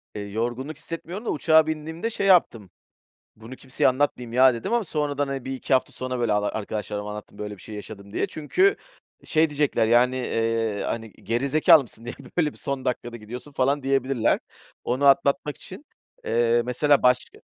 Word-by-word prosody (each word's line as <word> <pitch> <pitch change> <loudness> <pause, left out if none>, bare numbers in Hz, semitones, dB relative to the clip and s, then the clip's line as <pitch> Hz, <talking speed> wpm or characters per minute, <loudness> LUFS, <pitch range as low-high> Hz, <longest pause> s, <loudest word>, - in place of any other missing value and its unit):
Eee, 105 - -4
yorgunluk 120 +8 -4
hissetmiyorum 170 +7 -7
da, - - -2
uçağa 160 +1 +4
bindiğimde, 160 +7 -3
şey 200 -3 -2
yaptım. 120 - +3 0.7
Bunu 115 +4 -11
kimseye 130 0 0
anlatmayayım 130 -3 0
ya, 130 0 +6
dedim. 115 - -4
Ama 235 - +2
sonradan 145 -4 -1
hani, 135 -2 -5
1-2 135 0 -2
hafta 130 - +2
sonra 130 -1 -4
böyle 115 -3 +1
ar 105 0 0
arkadaşlarıma 105 -1 -4
anlattım. 105 0 -9
Böyle 105 -1 -6
bir - - -16
şey 110 - -9
yaşadım, 100 -1 -10
diye. - - 0
Çünkü, 370 - +1 0.5
şey, 160 0 +2
diyecekler 145 -6 +1
yani, 125 +2 +4
eee, 115 -3 -1
hani, 115 -2 -4
geri 120 +7 -2
zekâlı 155 +2 +6
mısın? 115 -2 -14
Niye 120 - -6 0.2
öyle 155 -4 +2
bir - - -15
son 135 -1 -4
dakikada 120 -1 -3
gidiyorsun? 120 +6 -9
falan 140 +1 0
diyebilirler. 135 -3 +1 0.4
Onu 130 +4 0
atlatmak 140 +1 +3
için. - - -11 0.4
Eee, 120 0 +2
mesela 140 +3 +2
başka 125 0 +1
130 Hz, 175 wpm, -24 LUFS, 115-145 Hz, 0.7 s, ya